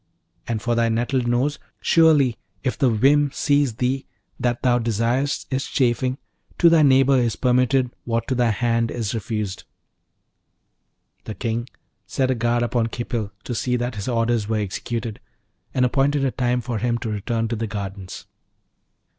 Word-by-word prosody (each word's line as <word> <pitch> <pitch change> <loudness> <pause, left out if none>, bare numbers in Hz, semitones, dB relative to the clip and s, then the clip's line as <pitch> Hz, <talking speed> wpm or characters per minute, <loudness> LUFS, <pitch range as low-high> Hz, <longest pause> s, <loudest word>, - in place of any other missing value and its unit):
And 115 -2 -2
for 120 - +1
thy 115 0 +2
nettled 120 +2 0
nose, 130 +5 0 0.2
surely 150 -7 +4 0.3
if 130 - 0
the 135 -3 +2
whim 140 +6 +3
seize 145 -5 +1
thee 130 +3 -1 0.3
that 120 -1 -1
thou 125 -1 +3
desirest 120 +5 0
its 135 +1 -1
chafing, 130 0 +1 0.4
to 170 - +6
thy 165 -2 +6
neighbour 135 -1 +5
is 120 -3 0
permitted 125 0 +2
what 115 -1 -2
to - - 0
thy 120 -2 +2
hand 115 +1 +1
is 115 -4 -3
refused.' 105 -3 -3 1.6
The 110 - -6
King 120 +1 -3 0.4
set 130 -1 0
a - - +3
guard 120 +1 +1
upon 120 -1 0
Khipil 115 -2 -4
to 125 - -4
see 125 +2 0
that 120 0 -2
his 105 -2 -5
orders 115 -3 +1
were 110 0 0
executed, 110 +2 -4 0.5
and 125 - +2
appointed 135 +2 +2
a 130 - +1
time 125 -1 0
for 120 -2 -3
him 120 +1 0
to 115 - -5
return 115 +2 -1
to 115 - -1
the 115 0 -3
gardens. 100 -2 -6
120 Hz, 165 wpm, -22 LUFS, 115-130 Hz, 1.6 s, to